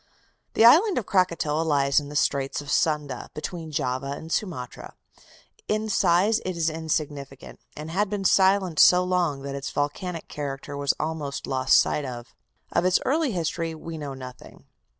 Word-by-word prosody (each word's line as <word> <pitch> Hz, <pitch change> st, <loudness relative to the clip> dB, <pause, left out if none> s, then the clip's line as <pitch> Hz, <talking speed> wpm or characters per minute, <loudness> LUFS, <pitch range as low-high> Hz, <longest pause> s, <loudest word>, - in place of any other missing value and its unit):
The 225 Hz, -, +5 dB
island 350 Hz, -, +6 dB
of 230 Hz, -, -1 dB
Krakatoa 170 Hz, -5 st, +1 dB
lies 140 Hz, -3 st, +2 dB
in 145 Hz, -1 st, -8 dB
the 150 Hz, -, -9 dB
Straits 140 Hz, -1 st, 0 dB
of 145 Hz, 0 st, -7 dB
Sunda, 150 Hz, -6 st, 0 dB
between 160 Hz, +1 st, -6 dB
Java 130 Hz, -1 st, -2 dB
and 160 Hz, +3 st, -9 dB
Sumatra. 165 Hz, -, -4 dB, 0.7 s
In 215 Hz, +1 st, -1 dB
size 195 Hz, +3 st, +3 dB
it 185 Hz, -2 st, -4 dB
is 165 Hz, -1 st, +1 dB
insignificant, 150 Hz, -4 st, -4 dB, 0.2 s
and 155 Hz, +2 st, -7 dB
had 200 Hz, +3 st, 0 dB
been 200 Hz, -1 st, -3 dB
silent 190 Hz, -4 st, +3 dB
so 180 Hz, 0 st, +7 dB
long 175 Hz, -6 st, 0 dB
that 140 Hz, 0 st, -5 dB
its 140 Hz, 0 st, -4 dB
volcanic 160 Hz, +4 st, -3 dB
character 140 Hz, -1 st, -6 dB
was 140 Hz, -1 st, 0 dB
almost 155 Hz, -3 st, -3 dB
lost 130 Hz, 0 st, +3 dB
sight 150 Hz, -, 0 dB
of. 120 Hz, -3 st, -8 dB, 0.4 s
Of -, -, +1 dB
its 185 Hz, 0 st, +3 dB
early 300 Hz, 0 st, +1 dB
history 165 Hz, -1 st, -2 dB
we 160 Hz, 0 st, -8 dB
know 140 Hz, -2 st, -6 dB
nothing. 130 Hz, -1 st, -11 dB
155 Hz, 165 wpm, -25 LUFS, 140-180 Hz, 0.7 s, so